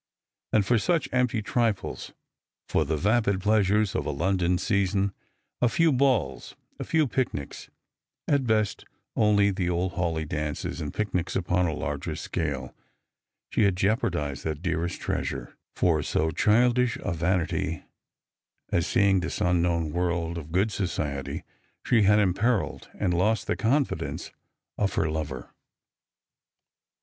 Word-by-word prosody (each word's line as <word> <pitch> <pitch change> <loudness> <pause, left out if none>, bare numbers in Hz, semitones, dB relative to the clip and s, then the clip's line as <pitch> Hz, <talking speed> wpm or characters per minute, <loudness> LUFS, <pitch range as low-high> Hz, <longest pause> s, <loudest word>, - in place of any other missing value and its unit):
And 105 -3 +3
for 120 +2 +3
such 170 +6 +1
empty 125 -3 +1
trifles, 115 -3 -1 0.6
for 80 - +2
the 80 +2 -1
vapid 105 +2 +2
pleasures 105 0 +2
of - - -1
a - - 0
London 90 +4 +1
season, 100 0 +1 0.5
a 120 - +4
few 165 +6 +3
balls, 130 - +1 0.2
a - - -2
few 160 -2 +2
picnics 120 - -3 0.3
— - - -64
at 140 -4 +2
best 110 -2 +1 0.3
only 105 -2 +4
the 95 -2 -1
old 90 +1 0
Hawleigh 85 -3 -1
dances 75 +3 -3
and 75 - -4
picnics 95 -4 -2
upon 90 -1 +1
a 80 - -2
larger 75 +2 -3
scale 75 -6 -3 0.4
— - - -62
she - - +1
had 100 -3 +4
jeopardised 90 - 0
that 80 +1 -4
dearest 85 -1 -1
treasure; - - -3 0.2
for 80 -4 +2
so 80 +2 0
childish 120 +4 +3
a - - -1
vanity 85 -1 -1 0.9
as 85 - +1
seeing 100 -1 +3
this 85 -1 -3
unknown 85 -2 +1
world 85 0 -1
of 80 -2 -7
good 95 +5 +2
society, 75 -8 -3 0.4
she 115 - +4
had 105 +1 +5
imperilled 105 +3 +1
and 90 - +1
lost 105 +6 +1
the - - 0
confidence 135 +5 -1 0.5
of 100 -2 0
her - - +1
lover 75 -5 -4
95 Hz, 140 wpm, -27 LUFS, 85-110 Hz, 0.9 s, had